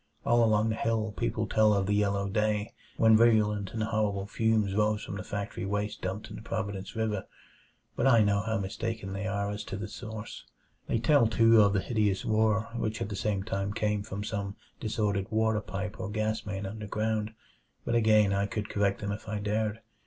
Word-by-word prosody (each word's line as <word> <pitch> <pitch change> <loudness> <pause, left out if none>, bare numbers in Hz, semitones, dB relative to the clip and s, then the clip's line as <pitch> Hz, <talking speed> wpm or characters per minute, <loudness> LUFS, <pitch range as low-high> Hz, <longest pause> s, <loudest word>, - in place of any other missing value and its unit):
All 120 0 +4
along 110 0 +3
the 110 - 0
hill 110 -2 -1
people 115 -1 -1
tell 110 0 +4
of 100 -1 +1
the 100 - 0
yellow 100 -1 +1
day, 105 +1 0 0.2
when 110 -1 +6
virulent 105 -3 +3
and 110 - -1
horrible 105 -3 0
fumes 110 -1 +1
arose 105 +1 +1
from - - -6
the 95 - -5
factory 100 +1 -4
waste 105 +2 -2
dumped 95 +3 -4
in - - -7
the - - -9
Providence 100 -4 -4
River, 110 -3 -1 0.7
but 125 - +2
I 115 -4 +6
know 100 0 +2
how 110 +1 -1
mistaken 105 0 -4
they 100 +2 -3
are 100 0 -1
as 105 +1 -4
to 100 - -5
the 110 +2 -5
source. 110 0 -8 0.4
They - - +1
tell, 120 +1 +4
too, 115 0 +5
of 100 -1 +4
the 100 - +2
hideous 105 -4 0
roar 110 0 +2
which 110 -2 -2
at 115 - -3
the 100 - -4
same 100 -1 -1
time 100 -1 -2
came 105 -1 0
from 100 0 -5
some 100 -2 -3 0.2
disordered 105 -3 -1
water 110 -1 +1
pipe 100 0 -5
or - - -4
gas 110 +1 -2
main 100 -1 -3
underground 110 +1 -2 0.5
but - - -1
again 110 -3 +4
I 100 0 +1
could 105 0 -4
correct 100 -1 0
them 100 -1 -2
if 105 +1 -6
I 105 - -2
dared. 105 +1 -1
105 Hz, 200 wpm, -29 LUFS, 100-110 Hz, 0.7 s, when